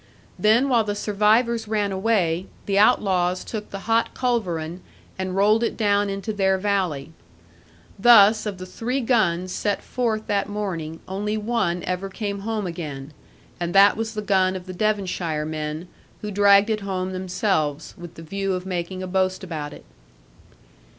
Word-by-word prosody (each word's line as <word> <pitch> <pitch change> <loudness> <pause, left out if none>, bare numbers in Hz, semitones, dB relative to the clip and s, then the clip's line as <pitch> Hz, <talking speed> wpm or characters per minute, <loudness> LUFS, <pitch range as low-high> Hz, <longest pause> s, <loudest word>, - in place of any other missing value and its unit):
Then 225 +6 +4
while 240 -4 +3
the 205 -1 -3
survivors 220 +3 +2
ran 210 -2 0
away, 190 -3 0 0.2
the 200 0 +1
outlaws 185 -3 +3
took 215 -2 -6
the 195 - -7
hot 230 +2 0
culverin, 180 -9 -2 0.4
and 185 -1 -3
rolled 210 +4 +3
it - - -1
down 205 -2 +2
into 195 +3 -4
their 190 -2 +2
valley. 185 -8 -1 0.9
Thus, 215 -1 +6
of 200 -3 -4
the 185 - -7
three 235 +8 -3
guns 185 -7 +1
set 205 +2 -2
forth 225 -4 -2
that 200 0 -1
morning, 170 -6 -4
only 210 +3 -2
one 210 -6 -1
ever 185 +2 -3
came 200 0 -4
home 215 0 -3
again, 150 -5 -6 0.5
and 175 +1 -3
that 200 +1 +7
was 225 0 -4
the 210 - -3
gun 190 -2 +2
of 180 -1 -6
the 185 - -7
Devonshire 180 -6 -1
men, 155 +2 -4 0.4
who 210 - -3
dragged 200 +1 +5
it 215 - 0
home 190 -2 -3
themselves, 185 -5 -1
with 175 -1 -11
the 165 - -10
view 195 +4 -2
of 185 0 -4
making 185 0 -4
a - - -4
boast 185 +1 0
about 155 -5 -5
it. - - -13
195 Hz, 165 wpm, -23 LUFS, 180-215 Hz, 0.9 s, that